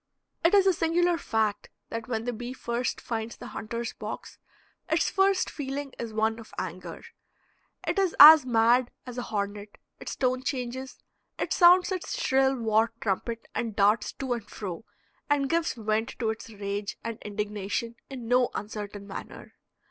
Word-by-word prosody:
It 335 +4 +5
is 395 -1 +6
a 380 - +5
singular 345 +1 +2
fact 215 -2 -1 0.2
that 230 -1 -5
when 225 -3 -2
the 245 - -1
bee 240 +2 -6
first 240 -1 -2
finds 225 0 -4
the - - -9
hunter's 230 +2 -4
box - - -7 0.5
its - - +2
first 385 0 +3
feeling 275 -1 -5
is 230 -1 -4
one 220 +1 0
of 225 - -13
anger; - - -6 0.8
it - - +1
is 380 -3 +1
as 305 0 +12
mad 240 +1 +3 0.2
as 250 -1 -6
a - - -1
hornet; 205 -2 -4 0.2
its - - -6
tone 255 -1 0
changes, 260 0 -4 0.3
it - - -1
sounds 360 +1 +6
its 370 -2 -3
shrill 265 0 +3
war 225 -1 +2
trumpet 230 +3 -2
and 225 -3 -3
darts 205 +2 +3
to 265 -2 -2
and 225 -3 -6
fro, 190 0 -6 0.4
and 280 -1 +2
gives 335 0 +1
vent 220 0 -1
to 225 -3 0
its 220 - -8
rage 200 -1 -4
and 230 -1 -5
indignation 210 +2 -3 0.2
in 255 -4 -7
no 250 +1 +3
uncertain 205 -1 -6
manner. 200 - -9
235 Hz, 165 wpm, -28 LUFS, 215-270 Hz, 0.8 s, as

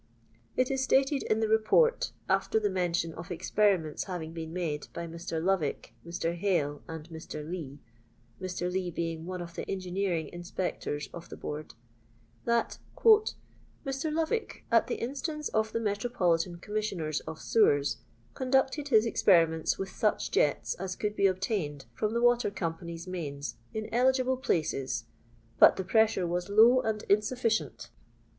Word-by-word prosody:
It 255 +1 +2
is 265 -1 0
stated 270 +1 +3
in 215 +1 0
the 220 - +2
Report, 220 - +3 0.2
after 220 - +2
the 205 -2 0
mention 175 -3 0
of 170 +4 -9
experiments 180 -3 +1
having 165 -4 -5
been 160 -1 -6
made 165 -4 -3
by 170 - -3
Mr. 165 0 -4
Lovick, 170 -11 0
Mr. 170 0 -2
Hale, 165 -6 0
and 160 -1 -7
Mr. 160 -2 -7
Lee 160 -6 -5 0.6
(Mr. 180 -1 -2
Lee 185 -1 -1
being 165 -1 -4
one 180 -1 -4
of 170 -1 -10
the - - -6
engineering 185 -3 -1
inspectors 175 -4 -3
of 170 0 -9
the - - -8
Board), 150 -2 -6 0.7
that 235 0 +1 0.3
"Mr. 315 -9 +1
Lovick, 325 +9 -2
at - - +4
the - - -1
instance 290 +5 -3
of 220 0 0
the 230 - -1
Metro 210 +1 -1
politan 175 -5 +1
Commissioners 190 -7 -2
of 160 - -6
Sewers, 145 -11 +3 0.4
conducted 265 +2 +1
his 225 -5 +5
experiments 165 -7 +3
with 195 0 -4
such 215 - 0
jets 145 - +2
as 185 0 -3
could 210 0 -2
be 200 - +4
obtained 185 -7 -2
from 215 +1 -1
the 235 - +1
water 240 -1 +4
companies' 170 -2 -5
mains 150 -6 -5
in 220 0 -4
eligible 260 +1 +3
places; 135 - -1 0.5
but - - +9
the 190 - -3
pressure 215 -1 +3
wns 175 +2 -2
low 230 +5 +6
and 220 -2 -2
insufficient. 220 +2 0
185 Hz, 150 wpm, -30 LUFS, 165-225 Hz, 0.7 s, but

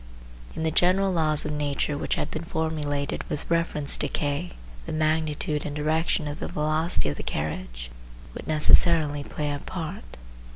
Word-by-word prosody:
In 160 - -3
the 160 - +1
general 185 +4 +3
laws 155 -3 +2
of 150 - -2
nature 145 0 -1
which 145 - -1
have - - -3
been 155 - -4
formulated 150 -4 -2
with 150 - -1
reference 165 -4 +3
to 145 - 0
K, 145 +5 -2 0.3
the - - -4
magnitude 155 -1 0
and 145 - -5
direction 155 +1 0
of 145 0 -5
the - - -4
velocity 155 - +1
of 75 - -4
the - - -4
carriage - - -4 0.4
would - - -8
necessarily 155 -1 +5
play 150 0 -3
a 145 - -4
part. 175 - -7
150 Hz, 165 wpm, -26 LUFS, 145-160 Hz, 0.4 s, necessarily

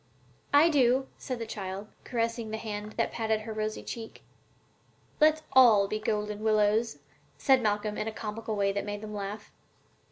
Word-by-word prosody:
"I 290 +3 +7
do," 265 -3 +3
said 255 -2 -4
the 230 - -4
child, 195 -2 -5 0.2
caressing 230 -1 -2
the 220 - -3
hand 210 -1 -5
that - - -24
had - - -17
patted 220 -1 0
her 220 0 -6
rosy 215 0 -3
cheek. 225 -1 -8 1.0
"Let's 310 0 +4
all 230 -7 +7
be 215 +2 -2
golden 210 -1 -2
willows," 215 +1 +2 0.4
said 265 -2 +4
Malcolm, 210 -1 -1
in 215 - -2
a - - -2
comical 220 0 -5
way 200 -1 +2
that 200 0 -2
made 205 0 -5
them 215 -1 -7
laugh. 205 +1 -6
215 Hz, 170 wpm, -29 LUFS, 210-235 Hz, 1.0 s, I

